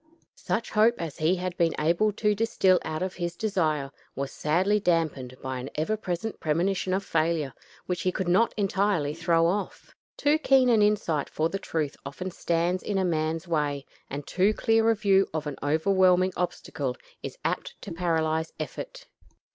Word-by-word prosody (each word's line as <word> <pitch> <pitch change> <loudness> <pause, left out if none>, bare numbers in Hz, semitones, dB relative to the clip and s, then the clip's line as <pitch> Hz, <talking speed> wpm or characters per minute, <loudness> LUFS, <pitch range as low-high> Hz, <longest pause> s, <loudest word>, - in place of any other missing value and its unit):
Such 225 - -2
hope 225 +2 +4
as 165 -4 -5
he 160 +4 +3
had 180 -1 -4
been 165 -2 +2
able 170 +7 +2
to 210 0 +1
distil 195 -4 +3
out 155 +2 -3
of 185 0 -3
his 175 -1 -4
desire 160 -10 0 0.2
was 140 0 -3
sadly 185 +7 +1
dampened 155 -9 0
by 130 -1 -3
an 130 +2 -6
ever 160 +8 0
present 195 +1 -4
premonition 180 +5 0
of 195 +1 -2
failure, 155 -4 0 0.3
which 180 -1 -2
he 185 - +1
could 185 0 -3
not 190 +7 +4
entirely 195 -6 +1
throw 165 0 +2
off. 190 +3 -2 0.2
Too 295 +2 +3
keen 265 -4 +4
an 225 -3 +4
insight 200 -8 +1
for 160 +1 0
the 195 - -3
truth 155 -6 -2
often 180 +7 -6
stands 175 +1 0
in 205 - -2
a 190 - +1
man's 160 0 -1
way, 145 -4 -1 0.2
and 140 +1 -5
too 195 +4 +2
clear 225 0 +3
a 225 - +4
view 195 -2 +3
of 155 -1 -2
an 145 -2 -5
overwhelming 185 +4 +3
obstacle 140 -7 -3 0.2
is - - -7
apt - - -2
to - - -7
paralyze 160 -2 0
effort. - - -6
175 Hz, 175 wpm, -27 LUFS, 155-200 Hz, 0.3 s, hope